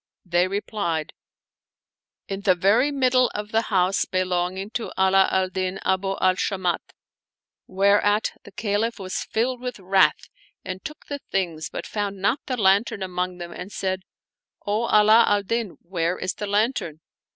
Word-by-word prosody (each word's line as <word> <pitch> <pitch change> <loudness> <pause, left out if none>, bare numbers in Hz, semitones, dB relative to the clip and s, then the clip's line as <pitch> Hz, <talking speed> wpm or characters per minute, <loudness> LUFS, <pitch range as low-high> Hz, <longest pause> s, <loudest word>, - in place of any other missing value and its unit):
" - - -60
They 175 +1 +4
replied, 195 -5 -2 0.6
" - - -68
In 195 0 -4
the 190 -2 +4
very 215 +10 +3
middle 255 -2 +3
of 210 0 -4
the 225 - +3
house 190 -1 +2
belonging 185 +2 -1
to 230 0 -4
Ala 190 0 +4
al 190 0 +1
Din 185 0 -3
Abu 195 +1 +1
al 185 0 +4
Shamat," 185 -4 0 0.9
whereat 205 +2 +3
the 205 - -13
Caliph 215 +3 -1
was 185 -2 -4
filled 245 +2 -1
with 250 0 -4
wrath 190 0 +2 0.4
and 185 +1 -6
took 305 -1 -8
the 285 -1 -5
things, 170 -5 -2
but - - -6
found 205 -2 -3
not 205 +8 +1
the 255 -3 -2
lantern 200 0 +2
among 180 -1 -3
them 175 -1 -7
and 180 +3 -8
said, 190 -1 -2 0.3
" - - -42
O 210 +3 0
Ala 215 +1 +6
al 205 -1 +2
Din, 230 -1 -2
where 170 0 0
is 185 - -2
the 210 - -5
lantern 205 - 0
195 Hz, 165 wpm, -24 LUFS, 185-215 Hz, 0.9 s, Ala